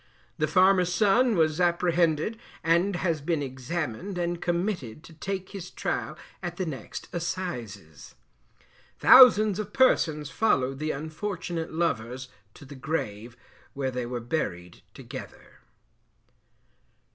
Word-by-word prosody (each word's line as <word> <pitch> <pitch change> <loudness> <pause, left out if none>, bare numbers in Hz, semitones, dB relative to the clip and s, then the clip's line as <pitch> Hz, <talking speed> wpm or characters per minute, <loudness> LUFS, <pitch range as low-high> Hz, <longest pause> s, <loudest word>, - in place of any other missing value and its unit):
The 155 - +2
farmer's 185 +2 +4
son 215 +6 +3
was 160 0 +2
apprehended, 175 +2 +1 0.2
and 170 +4 +2
has 170 -4 -1
been 150 0 -1
examined 145 - -4
and 175 -1 -2
committed 175 - -2
to 165 - -14
take 190 +4 -5
his 190 -3 -8
trial - - -3 0.2
at 175 -2 -5
the 185 - -1
next 135 -8 -7
Assizes. 120 - -5 0.8
Thousands 215 -6 +7
of 210 -1 -5
persons 155 - +2
followed 135 -11 +1
the 155 +1 -2
unfortunate 165 +2 -4
lovers 130 -6 -2 0.3
to - - -13
the 135 - -11
grave, 120 -5 -4 0.4
where 135 -1 -2
they 125 -1 -3
were 120 0 -3
buried 95 - -4
together. - - -10
165 Hz, 120 wpm, -27 LUFS, 135-185 Hz, 0.8 s, Thousands